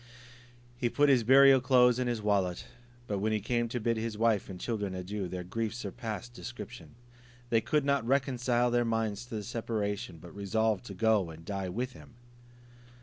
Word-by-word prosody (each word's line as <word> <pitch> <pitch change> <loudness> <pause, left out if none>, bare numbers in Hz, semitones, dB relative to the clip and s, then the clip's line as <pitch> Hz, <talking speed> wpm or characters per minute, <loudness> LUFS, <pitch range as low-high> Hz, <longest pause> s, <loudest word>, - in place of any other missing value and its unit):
He 120 -1 0
put 145 +4 +3
his 130 -4 +4
burial 135 +2 +7
clothes 125 -1 +4
in 125 - 0
his 120 -3 -2
wallet; 95 -4 0 0.4
but 100 -4 -2
when 110 +2 0
he 110 - +1
came 120 +2 -1
to 125 - -2
bid 115 0 0
his 110 -1 -3
wife 110 -3 +1
and 90 -2 -7
children 105 -3 -3
adieu, 95 +1 -4
their 90 0 -5
grief 110 +4 -3
surpassed 110 +1 -6
description. 120 -1 -9 0.6
They 115 -1 +4
could 150 +5 +1
not 140 -4 +1
reconcile 125 -2 +1
their 120 0 +3
minds 115 -1 -1
to 120 - -7
the 105 - -3
separation, 105 -3 -3
but 85 +2 -12
resolved 105 +2 0
to 100 - -8
go 110 -3 +2
and 80 0 -11
die 95 -1 -3
with 120 +7 -3
him. 120 - -15
115 Hz, 185 wpm, -30 LUFS, 100-120 Hz, 0.6 s, burial